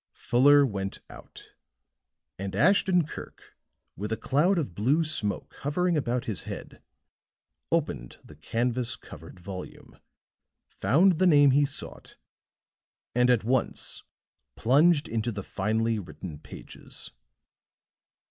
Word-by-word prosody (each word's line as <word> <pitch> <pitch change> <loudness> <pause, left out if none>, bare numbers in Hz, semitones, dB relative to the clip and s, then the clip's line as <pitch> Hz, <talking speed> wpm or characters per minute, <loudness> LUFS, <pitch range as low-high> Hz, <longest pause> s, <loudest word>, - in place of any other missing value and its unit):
Fuller 145 +4 +5
went 100 -5 -4
out; - - -13 0.9
and 95 -1 -4
Ashton 180 - +3
Kirk, - - -11 0.4
with 105 +3 -5
a 110 - 0
cloud 150 - +2
of 140 - -2
blue 130 - +2
smoke 110 -10 -1
hovering 175 +5 0
about 125 -4 -1
his 100 -8 -4
head, - - -8 0.9
opened 140 - -2
the 75 - -15
canvas 120 - -1
covered 80 +3 -13
volume, 90 +1 -9 0.7
found 160 - +2
the 185 - +4
name 145 -4 +6
he 140 +2 +3
sought, 140 - -6 1.0
and 125 +1 +3
at 120 -4 +3
once 125 +2 -1 0.5
plunged 150 +5 +3
into 115 +1 -2
the 100 -2 -6
finely 110 +3 -1
written 90 -4 -9
pages. - - -10
125 Hz, 115 wpm, -27 LUFS, 100-150 Hz, 1.0 s, name